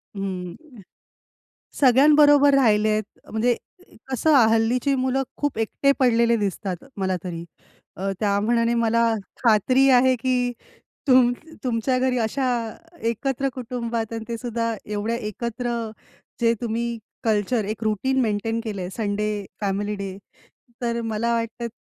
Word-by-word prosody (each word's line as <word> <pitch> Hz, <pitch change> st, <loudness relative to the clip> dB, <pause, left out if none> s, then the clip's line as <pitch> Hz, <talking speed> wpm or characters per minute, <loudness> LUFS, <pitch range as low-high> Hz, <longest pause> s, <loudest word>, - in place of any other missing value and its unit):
हं. 195 Hz, -, -6 dB, 1.0 s
सगळ्यांबरोबर 285 Hz, +2 st, +6 dB
राहिलेत 215 Hz, -4 st, +3 dB, 0.3 s
म्हणजे 235 Hz, +3 st, +2 dB, 0.6 s
कसं 300 Hz, +5 st, +2 dB, 0.2 s
हल्लीची 230 Hz, +5 st, +2 dB
मुलं 260 Hz, 0 st, 0 dB
खूप 290 Hz, -5 st, -2 dB
एकटे 275 Hz, +5 st, +2 dB
पडलेले 235 Hz, -2 st, +3 dB
दिसतात 195 Hz, -3 st, -3 dB
मला 190 Hz, -1 st, 0 dB
तरी. 170 Hz, -2 st, -5 dB, 0.5 s
अ, 195 Hz, +1 st, -2 dB
त्या 200 Hz, -1 st, +2 dB
मानाने 230 Hz, +2 st, +2 dB
मला 230 Hz, 0 st, +2 dB, 0.4 s
खात्री 255 Hz, +4 st, +4 dB
आहे 255 Hz, +1 st, +4 dB
की 245 Hz, 0 st, 0 dB, 0.6 s
तुम 255 Hz, -2 st, +6 dB, 0.3 s
तुमच्या 250 Hz, +1 st, 0 dB
घरी 255 Hz, -1 st, +1 dB
अशा 255 Hz, +4 st, 0 dB, 0.6 s
एकत्र 270 Hz, +3 st, -1 dB
कुटुंबात. 235 Hz, -3 st, -4 dB
आणि 225 Hz, -, -4 dB
ते 235 Hz, -1 st, -3 dB
सुद्धा 230 Hz, -1 st, -2 dB
एवढ्या 210 Hz, +2 st, -2 dB
एकत्र 235 Hz, +2 st, -4 dB, 0.7 s
जे 230 Hz, 0 st, +4 dB
तुम्ही 235 Hz, 0 st, -2 dB, 0.3 s
कल्चर 215 Hz, 0 st, +1 dB
एक 215 Hz, +2 st, -4 dB
रुटीन 220 Hz, +5 st, 0 dB
मेंटेन 225 Hz, 0 st, -1 dB
केल 200 Hz, -5 st, -4 dB
संडे 210 Hz, -1 st, -2 dB, 0.2 s
फॅमिली 205 Hz, +1 st, -1 dB
डे 195 Hz, -1 st, -6 dB, 0.6 s
तर 235 Hz, -1 st, -1 dB
मला 225 Hz, +1 st, -1 dB
वाटत 230 Hz, +1 st, -3 dB
230 Hz, 120 wpm, -23 LUFS, 210-250 Hz, 1.0 s, सगळ्यांबरोबर